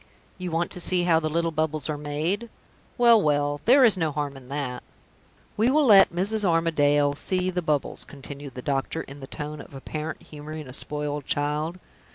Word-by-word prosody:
You 180 -1 -4
want 165 +1 -1
to - - -3
see 180 0 +1
how 165 -2 +4
the 155 -1 -2
little 165 +1 0
bubbles 155 -2 -1
are 155 - -2
made? 155 +10 -3 0.5
Well, 235 -3 +6
well! 145 -2 0
there 265 +3 +6
is 220 -5 +7
no 160 -3 0
harm 145 -1 -3
in 130 -1 -13
that. 135 -3 -4 0.7
We 225 +3 +2
will 295 +2 +3
let 200 -5 +7
Mrs. 200 +5 +2
Armadale 145 -5 +2
see 185 +5 -1
the 180 0 -2
bubbles," 150 -4 -2
continued 140 -1 -10
the 125 - -7
doctor, 140 +3 -2
in 140 +1 -11
the 135 - -9
tone 150 +1 -6
of - - -13
a 135 - -8
parent 155 +2 -6
humoring 155 0 -9
a 125 - -10
spoiled 150 0 -3
child. 150 +4 -1
155 Hz, 195 wpm, -25 LUFS, 145-180 Hz, 0.7 s, is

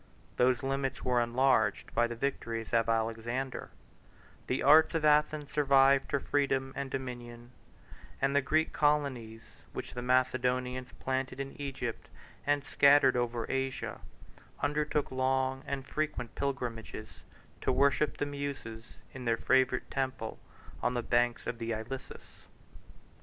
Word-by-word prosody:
Those 125 0 +3
limits 135 0 -2
were 125 -1 +2
enlarged 120 -3 +2
by 120 - +3
the 120 - -5
victories 115 -3 -3
of 115 -1 +3
Alexander; 115 +3 -2 0.8
the 130 - -1
arts 155 +4 +6
of 160 -1 +1
Athens 150 -1 +3
survived 135 -1 +4
her 140 - +2
freedom 135 -2 0
and 140 - -3
dominion; 120 -2 -6 0.7
and 135 +1 +1
the 145 - +5
Greek 155 +4 +1
colonies 130 -7 0 0.3
which - - -6
the 125 - -4
Macedonians 125 0 0
planted 130 0 -3
in 135 0 -4
Egypt, 130 -4 -4 0.4
and 145 -1 +2
scattered 140 -1 +5
over 120 -1 -1
Asia, 135 0 -3 0.6
undertook 150 0 0
long 130 0 0
and 135 -1 -3
frequent 150 -6 -3
pilgrimages 125 -5 -4 0.4
to - - +1
worship 140 +2 +2
the - - -1
Muses 140 -6 -6 0.2
in 130 -1 -7
their 115 -1 +2
favorite 130 0 +2
temple 130 -4 -3 0.4
on 125 - 0
the 120 - -1
banks 120 0 +1
of 120 - -4
the 115 0 -2
Ilissus. 110 +5 -8
130 Hz, 130 wpm, -31 LUFS, 120-140 Hz, 0.8 s, arts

